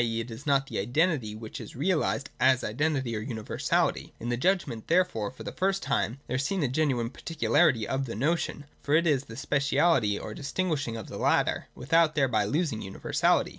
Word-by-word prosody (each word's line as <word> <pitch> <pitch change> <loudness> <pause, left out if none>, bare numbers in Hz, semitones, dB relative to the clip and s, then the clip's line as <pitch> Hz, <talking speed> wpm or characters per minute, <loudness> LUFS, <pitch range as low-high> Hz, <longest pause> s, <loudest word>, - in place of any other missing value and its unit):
e. 115 -1 -1
it 115 +1 -5
is 130 +7 -9
not 140 -1 +3
the - - -4
identity 125 - +1
which 110 0 -8
is - - -10
realised 145 -2 0
as 130 -1 +4
identity 135 0 -1
or 105 - -3
universahty. 110 -3 -1
In 120 - -4
the 120 - +1
judgment, 135 - 0
therefore, 165 - +2
for 130 - -11
the - - -5
first 195 +1 0
time 115 +8 -1
there 130 - -2
is 135 - 0
seen 195 +7 -1
the 145 - +2
genuine 125 -4 0
particularity 155 -8 +2
of 135 0 -1
the 115 - -5
notion: 145 +3 -1 0.2
for 145 - +1
it 170 +2 +4
is 145 -4 +2
the 115 - -10
speciality 140 -6 +2
or 105 - -6
distinguishing 145 -4 -2
of 110 - -6
the - - -7
latter, - - +1
without 155 +5 +2
thereby 125 -8 +2
losing 145 - -1
universality. 95 - +1
135 Hz, 195 wpm, -28 LUFS, 115-155 Hz, 0.2 s, as